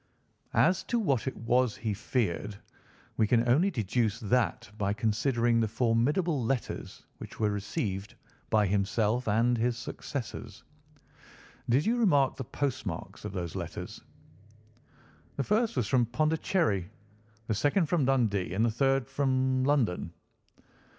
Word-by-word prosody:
As 180 +2 +4
to 240 - 0
what 140 - 0
it 130 - -3
was 120 +1 +1
he 110 -2 -2
feared, 105 -2 -2 0.6
we 110 - +3
can 120 +1 +3
only 155 +11 +4
deduce 115 - -1
that 115 -4 0
by 100 -1 0
considering 115 +2 +1
the 110 - +2
formidable 125 - +1
letters 125 +1 -3
which - - -10
were 105 -1 +2
received 100 0 -3 0.3
by 110 -1 +3
himself 105 +5 0
and 115 +4 +3
his 120 +1 +1
successors. 120 -1 -6 1.1
Did 130 +7 +3
you 235 +3 +2
remark 145 - +3
the 130 - -5
postmarks 120 - -4
of - - -4
those 85 -4 -4
letters?" - - -6 1.3
"The 140 - -1
first 215 - +1
was 120 -5 +1
from 120 +2 +2
Pondicherry, 155 - 0 0.6
the 110 - -1
second 145 - +2
from 155 -2 +1
Dundee, 110 -9 +1
and 110 +4 +3
the 115 - +1
third 135 +2 +1
from 130 -1 +1
London." 125 - +1
120 Hz, 135 wpm, -29 LUFS, 105-135 Hz, 1.3 s, As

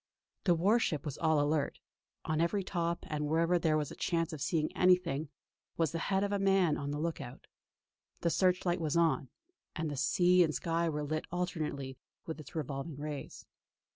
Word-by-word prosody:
The 175 -3 +5
war 200 +8 +4
ship 155 - -1
was 145 - -5
all 160 -2 +3
alert; 145 0 +1 0.5
on 155 0 0
every 190 +4 +1
top, 170 -2 -2
and 150 -1 -2
wherever 165 +3 +2
there 155 -2 +2
was 150 -2 -2
a - - -8
chance 165 -1 -1
of 150 - -6
seeing 155 +1 0
anything, 180 -5 +3 0.5
was 165 -3 +1
the 165 - -2
head 195 0 +2
of 200 - -1
a 200 - +1
man 195 -5 +3
on 140 - -4
the 145 - -2
look 160 0 -2
out. 125 -1 -9 0.8
The 170 - +1
search 185 +1 +2
light 175 0 +1
was 155 0 0
on, 165 -5 +2 0.5
and 150 -4 -2
sea 180 +5 +4
and 155 -3 0
sky 165 0 0
were 150 -1 -2
lit 155 +2 -2
alternately 155 -7 -3 0.3
with 160 -1 -5
its 155 +3 -11
revolving 145 0 -4
rays. 145 -1 -6
160 Hz, 190 wpm, -32 LUFS, 150-175 Hz, 0.8 s, The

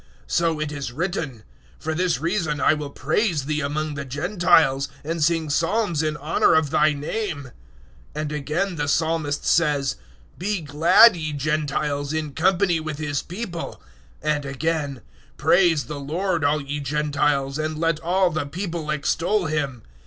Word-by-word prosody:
So 165 -2 +1
it 155 -1 -2
is 140 -4 -4
written, 150 - -3 0.3
"For 160 - -3
this 175 +1 0
reason 165 -4 -1
I - - +4
will 150 -2 -4
praise 155 +1 0
Thee 150 +1 -1
among 150 +2 -2
the 140 0 -4
Gentiles, 150 -2 +2
and 160 +1 -1
sing 165 0 +2
psalms 170 +1 +1
in 155 -1 -1
honour 150 +3 +2
of 155 -3 +2
Thy 155 +1 +4
name." 145 - -4 0.6
015:010 - - -2
And 155 -1 -3
again 150 +6 -1
the 145 -1 -1
Psalmist 155 -1 0
says, 145 -5 +2 0.4
"Be 200 +1 -1
glad, 165 +9 +6
ye 160 -3 -4
Gentiles, 145 0 -1
in 155 -2 -3
company 175 +2 +2
with 155 -2 -5
His 145 -2 -2
People." 180 -2 -6 0.4
015:011 155 0 +2
And 145 - -7
again, 140 -2 -2 0.4
"Praise 175 -5 +4
the 145 +4 -6
Lord, 170 +4 -1
all 145 +1 +2
ye 145 +1 -4
Gentiles, 145 -1 0
and 155 0 -2
let 165 -1 +1
all 180 +2 +2
the 155 -2 -2
people 170 -1 -4
extol 170 +6 0
Him." 140 -7 -2
155 Hz, 160 wpm, -23 LUFS, 145-170 Hz, 0.6 s, glad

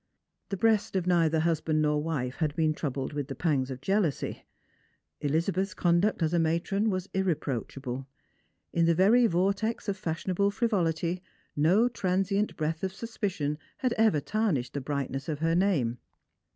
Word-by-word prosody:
The 195 - -2
breast 220 0 +2
of 185 -2 +1
neither 165 -3 +3
husband 160 -1 +1
nor 150 0 +2
wife 135 -5 -2
had 155 -3 -1
been 155 -2 +2
troubled 140 -2 -3
with 145 -2 -3
the 135 - -5
pangs 140 -6 0
of 130 -1 -6
jealousy. 190 -6 -1 0.7
Elizabeth's 170 +5 0
conduct 175 +2 +2
as 160 +1 +1
a 170 - +3
matron 170 +6 +1
was 185 -1 -2
irreproachable. 135 -7 -2 0.7
In 170 -1 +3
the 170 0 +3
very 225 +7 +5
vortex 200 +5 0
of 200 - 0
fashionable 185 +2 -1
frivolity 180 -6 0 0.3
no 180 +11 +4
transient 195 -2 0
breath 160 +2 -2
of 190 -1 -1
suspicion 185 -10 -3 0.2
had 255 -2 0
ever 220 -9 +3
tarnished 155 - -1
the 140 - -3
brightness 135 +1 -3
of 150 - -1
her 165 +2 +1
name. 160 - +1
170 Hz, 150 wpm, -28 LUFS, 150-195 Hz, 0.7 s, very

